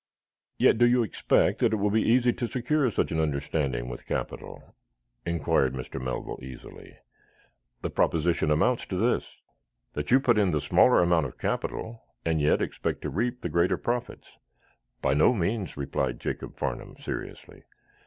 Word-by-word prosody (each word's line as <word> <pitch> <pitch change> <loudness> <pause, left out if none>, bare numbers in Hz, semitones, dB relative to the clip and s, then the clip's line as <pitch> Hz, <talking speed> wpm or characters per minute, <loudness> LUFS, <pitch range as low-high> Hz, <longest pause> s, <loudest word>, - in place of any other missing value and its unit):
"Yet - - +4
do 120 - +6
you 120 0 +3
expect 110 - +1
that - - +2
it - - +4
will 105 -1 0
be 110 +1 +3
easy 120 +1 +3
to 120 - -3
secure 130 +3 +1
such 105 - -1
an 80 - 0
understanding 70 -4 -1
with - - -8
capital?" - - -5 0.5
inquired 70 -5 +1
Mr. 65 +1 -6
Melville, 65 -1 -4
easily. 65 -1 -11 0.9
"The - - -2
proposition 80 -1 +1
amounts 115 +11 +2
to 95 - -3
this: 115 +5 +1 0.7
That 75 0 -4
you 130 - +6
put 120 -5 +3
in 100 -3 +3
the 75 -3 +1
smaller 80 - +4
amount 85 -4 +2
of - - -13
capital, 115 0 -3 0.2
and 80 -2 +1
yet 75 - +3
expect - - -3
to - - -3
reap 120 +4 -1
the 85 - -3
greater 85 +3 +2
profits." 120 0 -3 0.8
"By 65 - +3
no 75 - +4
means," 100 -1 -2
replied 70 -3 -2
Jacob - - -5
Farnum, - - -4
seriously. - - -7
85 Hz, 165 wpm, -27 LUFS, 75-120 Hz, 0.9 s, do